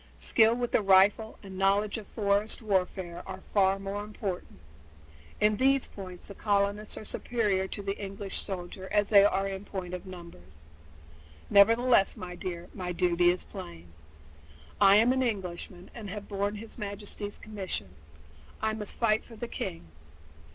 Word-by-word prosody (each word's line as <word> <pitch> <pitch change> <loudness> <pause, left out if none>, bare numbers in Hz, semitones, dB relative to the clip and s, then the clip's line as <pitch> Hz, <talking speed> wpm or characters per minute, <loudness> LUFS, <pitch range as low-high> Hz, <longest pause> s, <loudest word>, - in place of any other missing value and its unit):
Skill 225 0 +4
with 245 0 -2
the - - +3
rifle 200 +3 +4
and 190 -1 -8
knowledge 200 +2 +2
of 210 - -11
forest 205 +1 0
warfare 185 -3 -1
are 190 0 -7
far 195 -1 +4
more 195 +1 -4
important. 200 - -5 0.8
In 210 0 +3
these 270 +2 +3
points 185 -3 -9
the 200 - -8
colonists 205 +1 0
are - - -6
as 215 - -6
superior 205 -6 0
to 200 - -5
the 195 0 -2
English 195 0 -4
soldiers 190 0 -6
as 205 -1 +2
they 200 -2 +8
are 195 -1 +2
in 195 0 -5
point 185 -3 -6
of 180 +2 -6
numbers. 90 - -12 0.9
Nevertheless, 230 +1 +5
my 180 -1 -6
dear, 175 -1 -5
my 180 -2 -4
duty 175 0 +3
is 180 +1 0
plain. 85 0 -10 0.9
I 195 0 +8
am 230 +4 +5
an 260 - +1
Englishman 185 -5 -4
and 220 -4 -7
have 205 +1 -6
borne 200 +1 -1
his 225 +3 -9
Majesty's 205 0 -5
commission, 190 - -5
and - - -23 0.7
I 220 0 +2
must 210 -2 -5
fight 220 -2 +2
for 230 - -13
the 235 +2 -5
king. 85 - -5
200 Hz, 165 wpm, -29 LUFS, 185-210 Hz, 0.9 s, they